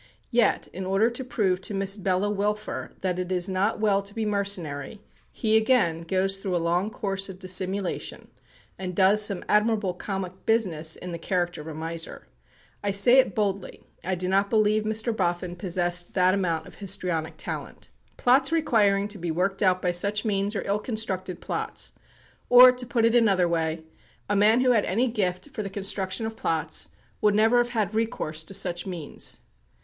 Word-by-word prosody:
Yet, 240 -1 +2
in 190 - -5
order 200 +5 +2
to 240 +3 -5
prove 195 -7 0
to 200 - -5
Miss 195 0 0
Bella 195 0 0
Wilfer 210 +1 -2
that 185 -1 -1
it 180 0 -3
is 180 -1 +1
not 195 +4 0
well 205 -2 +2
to 200 +1 -10
be 225 -1 -1
mercenary, 200 -5 -1 0.3
he, 220 -2 0
again, 220 -8 +3
goes 190 +3 0
through 195 -2 -3
a - - +3
long 180 +5 +1
course 195 -3 -1
of 190 - -8
dissimulation, 185 0 -2 0.5
and 180 -1 -5
does 200 +3 +5
some 200 -3 0
admirable 210 -3 +2
comic 190 0 -5
business 170 -9 +1
in 180 - -7
the 170 - -5
character 175 -2 -1
of 150 - -11
a 160 - -6
miser. 165 +1 -4 0.6
I 205 - 0
say 200 +6 +5
it 260 - +2
boldly, 200 -3 -2 0.2
I 185 +1 -1
do 180 +1 -3
not 195 +2 +2
believe 215 -1 +2
Mr. 220 +1 -1
Boffin 175 -2 -1
possessed 175 -1 -2
that 185 -1 +4
amount 170 -5 -1
of - - -13
histrionic 165 -4 -2
talent. - - -7 0.3
Plots 265 +4 +3
requiring 210 -11 +2
to 205 -1 -6
be 170 0 -3
worked 190 +4 -1
out 185 -2 +2
by 180 - +2
such 200 +5 0
means 200 0 0
are 195 - -3
ill 200 +1 0
constructed 190 -6 -3
plots; - - -4 0.6
or, 250 +1 +10
to 250 -1 -4
put 235 -2 +1
it 230 - +3
in 240 -1 +5
another 185 -4 +3
way, 160 -1 -1 0.4
a 205 - 0
man 215 +4 +5
who 255 -1 +4
had 220 -4 +3
any 230 +7 +1
gift 195 +2 -2
for 220 - -4
the 200 - -4
construction 195 +1 -2
of 220 0 -5
plots 160 -5 -2 0.3
would 210 -1 +3
never 225 +3 +4
have 240 0 +1
had 220 -4 -1
recourse 190 -8 -1
to 195 - -6
such 180 -2 -1
means. 170 -6 -3
195 Hz, 185 wpm, -26 LUFS, 180-215 Hz, 0.6 s, or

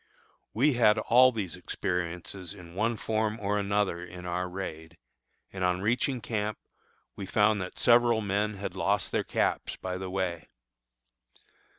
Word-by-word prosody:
We 135 +7 +3
had 115 -3 +4
all 125 +4 +6
these 105 -8 -4
experiences 90 +1 -4
in 85 -3 -12
one 110 +4 0
form 110 0 -1
or 105 0 0
another 100 -3 0
in 90 0 -9
our 90 +1 -2
raid, 85 -3 -7 0.6
and 95 -1 -3
on 90 0 +1
reaching 125 +4 0
camp 110 -1 -2 0.6
we 100 - -6
found 105 0 +3
that 90 - -6
several 120 -1 +5
men 105 0 -1
had 100 0 -5
lost - - 0
their - - +1
caps - - -1
by 95 0 -5
the 95 0 -5
way. 90 -3 -3
100 Hz, 150 wpm, -29 LUFS, 90-110 Hz, 0.6 s, all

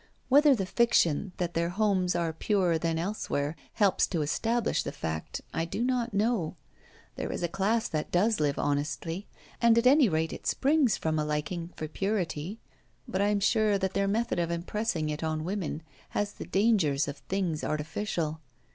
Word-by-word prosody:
Whether 285 +1 +6
the 195 -5 -2
fiction, 190 -5 +2
that 175 -1 -2
their 170 +1 0
homes 185 -2 +1
are 170 -2 0
purer 180 -1 +1
than 165 0 0
elsewhere, 165 -5 -2 0.2
helps 200 -3 +3
to 165 -5 -1
establish 225 +10 0
the - - -4
fact, 80 -1 -4
I 165 - 0
do 170 +7 -2
not 245 -1 0
know: 205 -5 0 0.6
there - - -3
is - - -4
a - - +2
class 210 +6 0
that 155 -1 -3
does 210 +5 +2
live 145 -2 +1
honestly; 150 +6 -2 0.3
and 235 -1 +5
at 235 - +3
any 270 -2 +6
rate 160 -1 0
it - - -7
springs 275 -6 +3
from 155 -1 -1
a - - +1
liking 150 +3 -3
for 155 - -4
purity; 185 0 -2 0.5
but 190 - -1
I 200 - +3
am 205 -1 +2
sure 215 0 +3
that 190 -1 -2
their 200 0 +1
method 220 -1 0
of 170 -1 0
impressing 170 -1 -1
it 150 +2 -4
on 155 -1 -1
women 175 -4 -3 0.3
has 205 0 0
the - - -8
dangers 190 -10 +2
of 145 0 -5
things 175 0 -2
artificial. 160 0 -2
180 Hz, 180 wpm, -29 LUFS, 160-215 Hz, 0.6 s, Whether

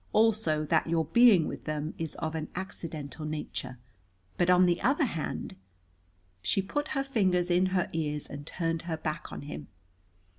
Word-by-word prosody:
Also 210 -9 +3
that 160 +2 +2
your 165 -1 +2
being 220 -5 +6
with - - -6
them 155 0 -2
is 165 -2 -3
of 160 0 -3
an 155 -1 -3
accidental 160 -5 -6
nature. 150 -4 -4 0.6
But, 175 - +2
on 180 0 +7
the 175 -1 +2
other 285 +4 +3
hand 165 - -4 0.4
" 90 0 -38 0.3
She 195 - +1
put 290 +10 -2
her 275 - +2
fingers 185 -9 +1
in 180 +2 +4
her 185 -1 +1
ears 150 -2 -1
and 145 +1 -8
turned 165 -2 -1
her 160 - -1
back 155 0 -4
on - - -6
him. 145 - -7
165 Hz, 175 wpm, -29 LUFS, 155-190 Hz, 0.6 s, on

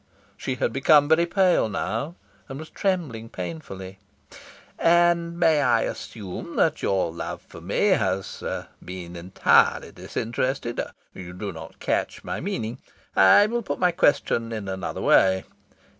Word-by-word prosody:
She 130 - -3
had - - -1
become 145 +2 +5
very 165 +2 +4
pale 180 - +3
now, 115 - -3 0.3
and 135 - -6
was 155 +2 -9
trembling 155 - -2
painfully. 95 +2 -7 0.8
"And 170 0 +3
may 160 -3 +4
I 120 -4 +3
assume 100 -6 -6
that - - +2
your 95 -4 +1
love 85 - -5
for 80 - -13
me 100 - +1
has 95 - 0 0.4
been 90 -1 -8
entirely 85 +2 +2
disinterested?... 120 +1 -3 0.3
You 90 -1 -9
do 100 +2 -5
not 80 -1 -10
catch - - -2
my - - -4
meaning? 135 - -4 0.4
I 95 - +7
will 235 +3 -1
put 210 - -4
my 180 -1 +3
question 120 -8 +1
in 110 -3 -5
another 95 -1 -4
way. 95 0 +4
115 Hz, 140 wpm, -24 LUFS, -, 0.8 s, I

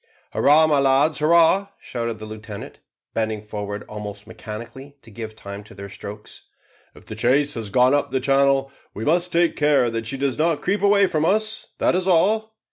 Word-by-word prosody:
"Hurrah, 150 +3 +5
my 150 -2 +2
lads, 140 +3 +3
hurrah!" 170 +5 +4
shouted 115 -2 -4
the 110 - -9
lieutenant, 105 -1 -9 0.3
bending 110 -1 -2
forward 105 -1 -6
almost 105 -1 -8
mechanically 120 +6 -9
to 115 - -15
give 110 0 -8
time 100 -1 -9
to 100 - -15
their 100 0 -8
strokes. 105 +2 -10 0.5
"If - - -16
the - - -8
chase 130 +6 +1
has 110 -3 -5
gone 125 +6 +4
up 145 - +1
the 130 - 0
channel, 135 0 +2 0.2
we 110 - -5
must 175 +3 +1
take 170 0 +2
care 145 -5 +2
that 115 -1 -3
she 135 - -3
does 135 0 -1
not 160 -1 +2
creep 200 +3 0
away 200 0 +5
from 160 -5 -1
us, 215 +5 0
that - - +2
is 185 +1 0
all." 215 +5 +2
135 Hz, 190 wpm, -22 LUFS, 110-160 Hz, 0.5 s, Hurrah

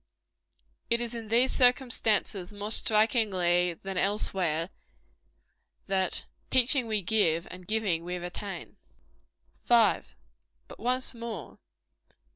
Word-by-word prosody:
It 235 - +2
is 240 -1 -4
in 230 -2 -7
these 240 +4 +3
circumstances 230 -7 +2
more 205 +1 -6
strikingly 195 -6 +2
true - - -31
than 190 -1 -3
elsewhere, 185 -4 0 1.1
that 190 -2 -1 0.2
"Teaching, 255 0 +4
we 215 -3 -1
give; 170 -5 +1
and 180 -1 -11
giving, 205 -6 0
we 180 +1 -4
retain." 180 +3 -7 0.9
5. 235 -2 +3 0.5
But - - -13
once 255 +2 0
more. 230 - -8
210 Hz, 105 wpm, -28 LUFS, 180-235 Hz, 1.1 s, Teaching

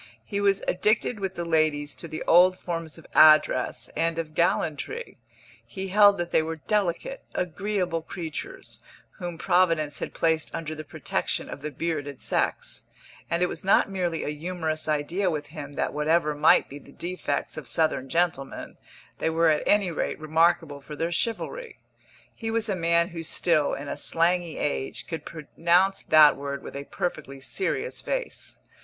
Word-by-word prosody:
He 200 -1 -2
was 200 -1 +2
addicted 215 +4 +1
with 190 -1 -3
the 170 - -3
ladies 155 -3 +1
to 170 - -8
the 155 0 -5
old 185 +2 +6
forms 165 -3 -5
of 165 - -14
address 155 -5 +5
and 165 +1 0
of 160 -2 -4
gallantry; 175 - -1 0.4
he 190 0 -6
held 205 +1 +6
that 175 -1 -3
they - - +4
were 160 +1 -3
delicate, 210 - -1
agreeable 180 -1 -1
creatures, 185 - -7 0.4
whom 175 -2 -5
Providence 165 -5 +2
had - - -5
placed 160 -1 0
under 160 -1 -4
the 155 0 -7
protection - - -3
of 140 - -7
the 150 - -4
bearded 145 -2 -3
sex; - - -1 0.4
and 170 +1 +1
it - - +5
was - - -4
not 195 +1 +4
merely 175 -4 -1
a - - -2
humorous 155 0 -3
idea 160 +6 0
with 150 -3 -3
him 145 -3 -7
that - - -2
whatever 150 +1 +2
might 150 +2 +5
be 140 - -9
the 140 - -16
defects 180 +5 -3
of - - -7
Southern 155 -5 0
gentlemen, 165 -4 -1 0.4
they - - +1
were 165 0 +3
at 150 -1 +2
any 205 -3 +4
rate 160 - -2
remarkable 160 -1 +2
for 150 +2 -9
their 165 +3 -2
chivalry. 445 - -3 0.6
He 225 - -5
was 225 0 +1
a 195 - +1
man 170 0 +2
who 170 -3 -6
still, 155 -2 +1
in 145 - -7
a - - -3
slangy 170 0 +1
age, 145 -2 -2
could 160 -3 -6
pronounce 170 +4 +1
that 155 -2 +7
word 140 0 -5
with - - -9
a 140 0 -5
perfectly 140 -6 -4
serious 190 - -3
face. - - -4
165 Hz, 170 wpm, -26 LUFS, 155-185 Hz, 0.6 s, that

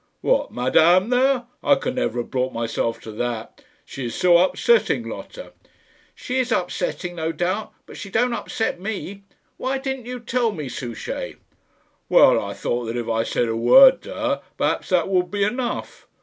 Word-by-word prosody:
"What, - - +1
Madame 170 - +3
there? 255 0 +3 0.2
I 285 - +5
could 250 - -3
never 190 - -1
have - - -11
brought 130 0 -1
myself 115 0 -2
to 110 - -9
that; 115 0 -5 0.2
she 130 -3 -6
is 115 - -6
so 175 -1 +5
upsetting, 465 - +2
Lotta." - - -9 0.6
"She 255 +1 -3
is 255 -1 -1
upsetting, 190 - -2
no 160 0 -1
doubt; 185 +6 -2
but - - -12
she 200 - -7
don't 240 +4 +1
upset 225 -4 -3
me. 200 0 -5 0.4
Why 265 +1 -1
didn't 265 -2 -5
you 250 0 -5
tell 235 -1 0
me, 150 -7 -6
Souchey?" 120 -1 -6 0.7
"Well, - - +6
I - - -6
thought 120 0 -2
that 115 +2 -4
if 120 - -4
I 115 0 +1
said 115 +1 -1
a 115 - -2
word 260 - +7
to - - -9
her, - - -1 0.2
perhaps - - -1
that 180 -3 +2
would 180 -2 +1
be 205 -1 -1
enough. 240 +4 -3
185 Hz, 180 wpm, -22 LUFS, -, 0.7 s, word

